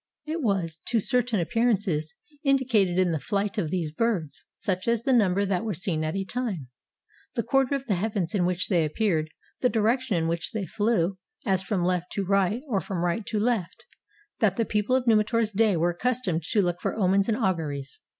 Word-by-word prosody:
It 320 +2 -3
was, 185 - -1
to 235 - +2
certain 245 -1 +1
appearances, 190 -6 0 0.3
indicated 245 -10 +2
in 185 -2 +3
the 160 - -1
flight 205 +5 -1
of 165 -6 -1
these 165 -3 -2
birds 175 -4 -2
— - - -64
such 185 +1 -2
as 235 -1 +1
the 265 - +2
number 200 -4 +3
that 190 -2 0
were 215 -4 -2
seen 165 -3 -2
at 155 +2 -2
a 195 0 -2
time, 195 - -3 0.7
the 235 - 0
quarter 270 +3 +2
of 275 -1 -4
the 220 - +1
heavens 195 -2 -1
in 195 -4 +2
which 180 +1 0
they 175 -5 +2
ap 155 -1 -4
peared, 165 -8 +1 0.3
the 250 - +3
direction 230 0 +1
in 165 -1 0
which 170 0 -2
they 215 -3 -2
flew, 200 -3 0 0.3
as 190 -2 +2
from 190 -2 -1
left 180 -1 -1
to 200 - -1
right 195 +5 +1
or 205 -7 0
from 175 -3 -2
right 175 +6 0
to 215 - -1
left 210 -6 -1 0.3
— - - -35
that - - +3
the 230 - +1
people 210 +4 +1
of 260 -1 +1
Numi 215 -2 +4
tor's 230 -2 +1
day 210 -2 +3
were 170 +2 +2
accustomed 195 -3 -1
to 200 +5 +1
look 175 0 -1
for - - -1
omens 195 +1 +2
and 220 - +1
au 190 -6 +2
guries. 145 -5 -6
200 Hz, 220 wpm, -26 LUFS, 175-230 Hz, 0.7 s, Numi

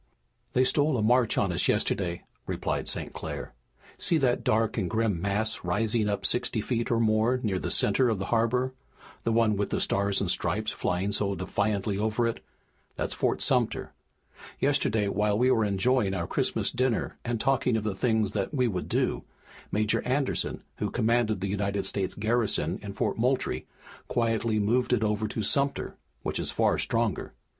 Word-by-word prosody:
"They 130 - +4
stole 145 +2 +2
a 110 - 0
march 120 0 +3
on 100 -3 +2
us 85 - +1
yesterday," 85 -3 0 0.2
replied - - -2
St. - - -3
Clair. - - -6 0.5
"See 170 - +2
that 130 -5 +1
dark 110 0 +1
and 95 -6 -1
grim 110 -4 0
mass 105 +3 -1
rising 105 +4 +1
up 100 - -2
sixty 120 -1 +1
feet 115 +2 -1
or 115 - +2
more 110 +3 +2
near 95 -4 0
the - - -3
center 130 -2 +3
of 110 - 0
the 95 - -3
harbor, 125 +3 +1 0.5
the 115 - +2
one 115 -2 +3
with 100 0 -1
the - - -1
Stars 100 0 +1
and 95 -3 0
Stripes 105 +5 -1
flying 95 +3 -1
so 100 -1 0
defiantly 100 +2 -1
over 110 +2 +1
it? 115 - -2 0.5
That's - - -2
Fort - - 0
Sumter. - - +1 0.7
Yesterday, 105 -1 +2
while 105 +1 +1
we 125 +3 +3
were 110 - +3
enjoying 105 +1 +1
our 85 -3 -2
Christmas - - 0
dinner 130 -2 -1
and 120 -1 -2
talking 125 -2 +2
of 110 - -3
the 105 -2 -1
things 110 -1 +1
that 100 -2 -2
we 125 -2 +2
would 95 -5 -3
do, - - 0 0.5
Major 105 +1 +1
Anderson, 130 +2 -1
who - - -1
commanded 115 -3 +1
the 100 - -1
United 100 0 -1
States 95 -2 -2
garrison 110 -5 0
in 100 -1 -6
Fort 100 - -1
Moultrie, 125 +3 0 0.4
quietly 115 -1 0
moved 120 +5 +2
it 115 -3 +2
over 105 0 0
to 110 +1 -3
Sumter, 140 +6 +1 0.3
which - - -2
is - - -2
far - - +1
stronger. - - -1
110 Hz, 175 wpm, -28 LUFS, 100-120 Hz, 0.7 s, They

